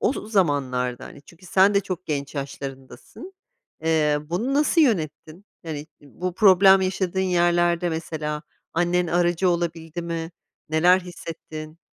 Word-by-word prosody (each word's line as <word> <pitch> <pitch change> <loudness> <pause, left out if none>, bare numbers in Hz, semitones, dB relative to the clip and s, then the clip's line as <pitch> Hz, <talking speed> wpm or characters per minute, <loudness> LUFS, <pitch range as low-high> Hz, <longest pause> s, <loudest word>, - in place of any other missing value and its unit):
o - - +2
z 220 -5 -8
zamanlarda, 130 - 0
hani, 145 - -12
çünkü 170 +5 -17
sen 195 +3 +4
de 200 - +4
çok 185 -3 -6
genç 140 -2 -3
yaşlarındasın. 135 - -8 0.5
Eee, 155 -2 +2
bunu 180 - -2
nasıl 300 +3 +3
yönettin? 175 - -1 0.2
Yani, 155 -2 -5
bu 175 +5 -6
problem 195 -1 +6
yaşadığın 190 0 -1
yerlerde 175 -1 +2
mesela 155 -2 -4 0.3
annen 175 +1 +1
aracı 175 +2 +1
olabildi 170 -1 -2
mi, 165 0 -4 0.4
neler 175 +4 +4
hissettin? 160 -3 -9
170 Hz, 130 wpm, -23 LUFS, 155-185 Hz, 0.5 s, problem